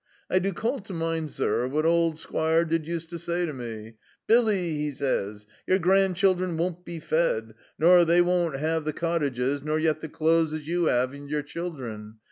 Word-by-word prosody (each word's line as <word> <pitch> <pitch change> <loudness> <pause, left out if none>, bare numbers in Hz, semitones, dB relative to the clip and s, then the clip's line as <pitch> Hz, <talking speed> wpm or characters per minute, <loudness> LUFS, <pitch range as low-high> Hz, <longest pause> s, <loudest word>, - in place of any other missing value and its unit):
"'I 185 - +4
do 195 +2 -1
call 235 +9 -2
to 195 -2 -9
mind, 165 -2 -2
zur, 125 - 0
what 150 +4 -1
old 165 -1 +2
Squire 160 +1 +1
did 160 -1 -1
use 165 -1 -3
to 170 +1 -7
zay 175 +1 -1
to 155 - -4
me: 115 -3 -8 0.3
"Billy," 225 -3 +4
'e 155 -5 -2
zays, 105 -7 -2 0.2
"your 185 - +4
grandchildren 185 -1 +2
won't 175 +1 -2
be 170 -2 -7
fed, 150 -9 0 0.2
nor 175 +3 +6
they 170 +1 +4
won't 175 -4 +1
'ave 160 +3 -1
the 155 0 -2
cottages, 145 -5 -1
nor 155 +2 -1
yet 155 -1 0
the 160 - -6
clothes 160 0 +2
as 155 -1 -7
you 170 0 +1
'ave 125 +2 +1
and 140 0 -10
your 150 0 -1
children. 130 -10 -6
160 Hz, 190 wpm, -26 LUFS, 145-175 Hz, 0.3 s, nor